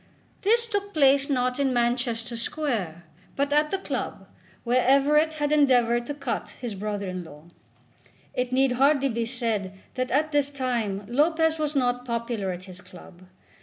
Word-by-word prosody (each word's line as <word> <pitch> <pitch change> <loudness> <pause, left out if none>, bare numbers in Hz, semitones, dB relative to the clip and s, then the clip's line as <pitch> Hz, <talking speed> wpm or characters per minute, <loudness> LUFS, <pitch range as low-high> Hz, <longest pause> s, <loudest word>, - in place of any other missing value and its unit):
This 465 +4 +3
took 405 -3 -3
place 275 -1 +4
not 250 -1 0
in 275 -2 +2
Manchester 240 -1 0
Square, 230 - -3 0.3
but 280 +1 0
at 300 +1 +3
the 390 - 0
club, 385 - -5 0.4
where 250 +1 +2
Everett 295 +5 +4
had 295 -1 -1
endeavoured 245 -5 +3
to 290 - -4
cut 280 -4 -4
his 240 -4 -4
brother 205 0 -4
in 185 -1 -4
law. 150 -2 -13 0.9
It 250 0 -2
need 265 0 +3
hardly 275 +2 +3
be 230 -1 -1
said 225 -5 -2 0.2
that 255 0 -2
at 305 +3 +1
this 290 -1 +2
time 235 -8 -2
Lopez 320 +5 +2
was 300 -1 -1
not 245 -2 +1
popular 235 -4 -3
at 180 0 -7
his 185 -1 -11
club. 180 0 -15
250 Hz, 165 wpm, -26 LUFS, 230-290 Hz, 0.9 s, place